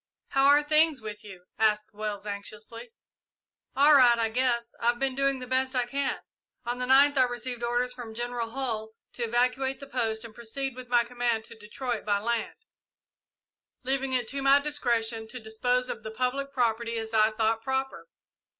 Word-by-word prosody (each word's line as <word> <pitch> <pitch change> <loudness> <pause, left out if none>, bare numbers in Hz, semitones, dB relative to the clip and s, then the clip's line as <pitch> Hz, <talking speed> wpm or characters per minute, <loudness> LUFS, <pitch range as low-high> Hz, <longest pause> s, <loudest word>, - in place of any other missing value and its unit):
"How 270 0 +3
are 290 +1 +6
things 305 0 +3
with 210 -1 -8
you?" 190 -4 -12 0.2
asked 215 0 +1
Wells, 210 -1 -5
anxiously. 215 +3 -7 0.9
"All 290 +3 +6
right, 245 -4 +7
I 225 -1 +1
guess; 235 0 0
I've 240 +1 +2
been 270 +1 0
doing 275 0 +1
the 255 - -6
best 260 +1 0
I 250 -1 +2
can. 275 +2 -1 0.5
On 240 +1 -3
the 250 - -1
ninth 275 +1 +6
I - - +7
received 245 0 -4
orders 245 +1 0
from 235 -3 -9
General 240 -1 -3
Hull 225 -4 -3 0.2
to 240 - -3
evacuate 250 +3 0
the 275 - -9
post 230 -4 -2
and 225 - -11
proceed 245 +3 -4
with 255 -1 -9
my 240 -1 +3
command 240 -2 -1
to - - -12
Detroit 230 +2 -5
by 205 -1 +1
land, 230 +2 -2 1.3
leaving 270 +1 -1
it 250 -3 0
to 275 0 -3
my 275 +1 +6
discretion 235 -6 -1
to 250 +3 -8
dispose 245 +3 -1
of 220 - -5
the 220 - -6
public 255 +5 -2
property 235 -2 0
as 225 0 -5
I 215 -1 +5
thought 220 +1 +1
proper. 265 - -3
240 Hz, 180 wpm, -28 LUFS, 225-265 Hz, 1.3 s, right